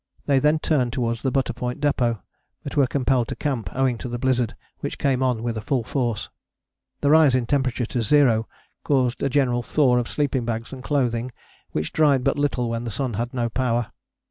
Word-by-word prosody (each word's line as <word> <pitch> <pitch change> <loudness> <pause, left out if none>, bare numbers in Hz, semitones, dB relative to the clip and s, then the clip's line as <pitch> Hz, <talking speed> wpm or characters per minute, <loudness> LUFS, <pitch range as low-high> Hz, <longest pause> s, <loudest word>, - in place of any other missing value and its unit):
They 140 -2 +3
then 150 +3 +3
turned 140 -6 +1
towards 115 -3 -1
the 130 - 0
Butter 130 -1 0
Point 125 +1 -4
Depôt, 120 -6 +1 0.4
but - - -6
were 140 -3 +4
compelled 130 -2 +1
to - - -4
camp 125 -9 -2
owing 130 -3 0
to 125 - -5
the 120 - -3
blizzard 125 -2 0 0.2
which - - -4
came 130 -2 +1
on 125 -3 0
with 115 -2 -2
full 130 0 0
force. 120 -3 -2 0.7
The 140 - +3
rise 155 -4 +6
in 125 -2 +1
temperature 130 -2 0
to 120 +1 -2
zero 115 -2 +3 0.4
caused 130 -4 +1
a 140 - +1
general 125 -3 +2
thaw 125 -1 +2
of 120 - -3
sleeping 140 -4 0
bags 115 +2 -4
and 130 -1 -8
clothing 125 -4 0 0.4
which 75 - -3
dried 145 -5 +3
but 140 +1 +1
little 135 -4 0
when 115 0 -3
the 120 - -4
sun 125 +3 -2
had 120 +4 -2
no 120 -2 -1
power. 120 -1 -1
125 Hz, 200 wpm, -23 LUFS, 120-135 Hz, 0.7 s, rise